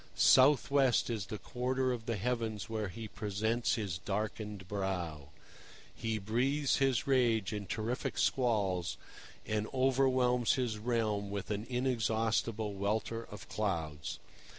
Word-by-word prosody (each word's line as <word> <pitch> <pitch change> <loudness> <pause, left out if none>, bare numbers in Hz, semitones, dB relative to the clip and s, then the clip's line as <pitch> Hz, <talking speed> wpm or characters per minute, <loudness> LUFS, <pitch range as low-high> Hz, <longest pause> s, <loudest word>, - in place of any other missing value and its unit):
South 135 +1 +6
west 135 -4 +3
is 105 -4 -3
the 105 - -4
quarter 130 +5 -1
of 120 -1 -4
the 115 - 0
heavens 110 0 -2
where 110 -2 -2
he 110 +4 -7
presents 110 +3 0
his 100 -6 -3
darkened 105 -1 -4
brow. 90 -8 -3 0.6
He 110 -1 -2
breathes 130 +8 +1
his 135 -1 +2
rage 120 -7 +2
in 105 -2 -4
terrific 115 +4 -2
squalls, 100 -9 +1 0.5
and 105 0 -1
overwhelms 130 -2 +3
his 120 -5 -1
realm 110 -3 0
with 100 0 -4
an 105 +2 -3
inexhaustible 115 -3 0
welter 110 +3 -1
of 105 - -10
clouds. 80 -8 -2
110 Hz, 130 wpm, -33 LUFS, 100-125 Hz, 0.6 s, South